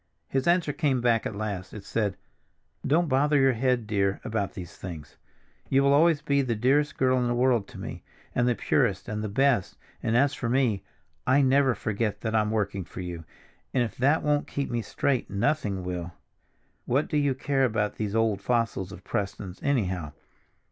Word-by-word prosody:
His 135 +2 -1
answer 170 -4 +3
came 140 -6 +1
back 120 -2 +2
at 105 - -6
last. 100 -3 -4
It 105 - -8
said: 100 -3 -1 0.7
"Don't 165 +5 +2
bother 145 +2 +3
your 135 -1 +4
head, 125 -1 +1
dear, 100 -2 0
about 110 -4 -2
these 90 -6 -8
things. 80 -5 -8 0.5
You 135 +1 +4
will 140 0 +4
always 155 0 +4
be 140 0 +2
the 120 -4 -1
dearest 135 +7 +2
girl 130 0 +3
in 125 - +1
the 120 - 0
world 120 -4 +2
to - - -12
me, - - -7 0.3
and 120 - +2
the 120 - +2
purest 105 -2 +1
and 105 0 -3
the 105 - -2
best; 130 -1 +1 0.2
and 115 - +1
as 140 +2 +3
for 120 - -3
me, 120 -6 +2 0.5
I 135 +2 +5
never 135 -1 +4
forget 110 0 -2
that 110 -1 -2
I'm 105 -1 +2
working 100 -3 -1
for 90 - -8
you, 85 -2 -6 0.5
and 125 - +4
if 115 - -5
that 140 +5 +3
won't 150 -1 +1
keep 140 -2 -3
me 120 -1 0
straight, 130 +3 -1
nothing 100 -3 0
will. 90 -1 -4 0.7
What 135 +5 +1
do 150 - -1
you 145 -2 +2
care 135 0 0
about 110 -4 0
those 105 -1 -2
old 110 -3 +1
fossils 115 -5 0
of 95 -2 -11
Prestons, 100 -2 -4
anyhow? 95 - -1
120 Hz, 190 wpm, -27 LUFS, 100-135 Hz, 0.7 s, I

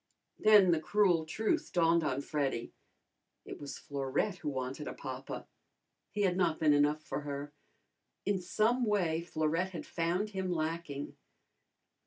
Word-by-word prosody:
Then 210 -4 +7
the 165 - +3
cruel 175 -2 +2
truth 215 +7 0
dawned 170 -1 +3
on 140 -2 0
Freddy. 140 -5 -2 0.7
It - - -8
was 145 -1 -6
Florette 140 +8 -2
who 155 - -3
wanted 130 +2 -4
a - - -5
papa. - - -6 0.6
He 205 - -1
had 180 -2 +2
not 170 -4 +2
been 155 -2 +5
enough 145 +1 +3
for - - -4
her. 145 0 -5 0.7
In 200 -1 +1
some 220 +7 +2
way 175 -7 +1
Florette 165 +3 -1
had 170 - -5
found 175 +5 -1
him 190 -2 -2
lacking. 155 -3 -3
165 Hz, 145 wpm, -32 LUFS, 145-190 Hz, 0.7 s, Then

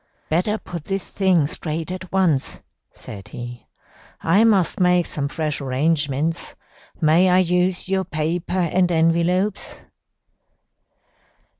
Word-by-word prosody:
"'Better 185 +7 +1
put 170 -7 -8
this 195 -1 -3
thing 185 -6 +2
straight 160 +1 -4
at 185 0 -7
once,' 175 -8 +1 0.3
said 100 -2 -11
he. 120 0 -9 0.6
'I 195 +7 +4
must 200 -6 +2
make 180 -1 +3
some 140 -1 -3
fresh 150 0 -3
arrangements. 145 +3 -1 0.4
May 170 +3 +4
I 180 - +4
use 180 0 +1
your 190 0 0
paper 170 +2 -2
and 175 +1 +1
envelopes?' 170 +5 0
170 Hz, 115 wpm, -21 LUFS, 155-185 Hz, 0.6 s, I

